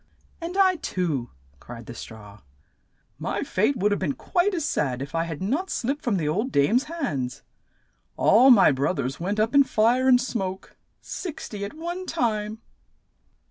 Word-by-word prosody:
"And 345 +3 -5
I 375 -2 +4
too!" 155 - -2 0.3
cried 115 - -10
the 120 - -8
straw. 105 -3 -11 0.8
"My - - -2
fate 220 +8 +1
would 205 0 +1
have 205 - +1
been 150 -8 -1
quite 370 - 0
as 325 -4 -1
sad 130 - -1
if 140 +2 -6
I 165 0 0
had 165 +1 -5
not 290 - -1
slipped 275 +5 -2
from 225 -6 +1
the 155 -4 -1
old 210 - -1
dame's 220 - +3
hands. 140 - -4 0.7
All 245 +6 +6
my 215 - +7
broth 140 +7 0
ers 130 +2 -3
went 200 +5 -2
up 220 +3 +1
in 280 0 +7
fire 245 +2 +2
and 250 -1 +6
smoke 195 -7 -4 0.2
— - - -48
six 345 -5 -6
ty 210 - -7
at 200 +5 -5
one 345 +3 -5
time." 220 -6 -2
210 Hz, 180 wpm, -25 LUFS, -, 0.8 s, my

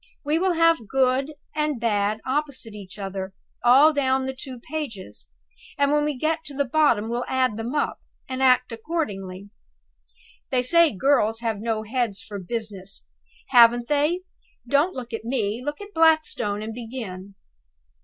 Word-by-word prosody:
We 305 +3 +1
will 370 0 +2
have 330 -8 +3
'Good' 265 +3 +1 0.2
and 300 -4 0
'Bad' 215 -1 0
opposite 265 -4 -2
each 195 -2 -10
other, 195 -1 -5 0.3
all 270 +6 +7
down 265 -2 +1
the 265 - -3
two 260 -1 -8
pages; 255 -9 -6 0.5
and 285 -1 +3
when 295 0 +2
we 295 -3 -2
get 315 +4 -1
to 285 -2 -7
the 280 0 +1
bottom, 245 -6 +2
we'll 240 +2 -2
add 255 -4 +1
them 230 +5 -4
up, 295 - 0 0.3
and 260 0 -4
act 255 -1 +4
accordingly. 205 - -4 1.0
They 250 -1 +1
say 335 +4 +5
girls 225 0 +2
have 225 -3 -2
no 220 0 -2
heads 225 -3 -1
for 215 -3 -7
business. 200 -1 -5 0.5
Haven't 240 -1 +6
they! 300 +5 +2 0.5
Don't 285 +8 +2
look 245 -2 -7
at 225 - -4
me 230 -1 -2
look 295 +2 -4
at 410 0 -10
Blackstone, 315 -10 +2
and 220 +1 -5
begin." 220 -5 -7
250 Hz, 155 wpm, -24 LUFS, 215-290 Hz, 1.0 s, all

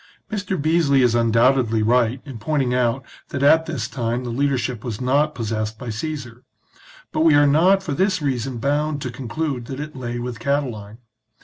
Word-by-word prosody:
Mr. 195 -4 -2
Beesly 150 -3 +3
is 120 -2 +3
undoubtedly 115 0 +3
right 120 +2 +2
in 135 -6 -8
pointing 135 0 0
out 125 +1 0 0.2
that 135 - -3
at 160 +3 +5
this 135 -9 -3
time 120 -1 -2
the 120 - -4
leadership 125 -3 -1
was 115 -5 -4
not 145 +4 +1
possessed 110 -1 -3
by 125 -2 -6
Caesar; 125 -1 -6 0.7
but - - -2
we 160 -2 +5
are 145 0 +6
not 180 +7 +4
for 170 - -4
this 190 +4 +1
reason 130 -4 -2
bound 145 +4 0
to 125 - -4
conclude 130 +1 -4
that 135 +2 -6
it 150 0 -6
lay 120 -2 -4
with 120 -2 -5
Catiline. 120 -6 -2
130 Hz, 180 wpm, -22 LUFS, 120-150 Hz, 0.7 s, are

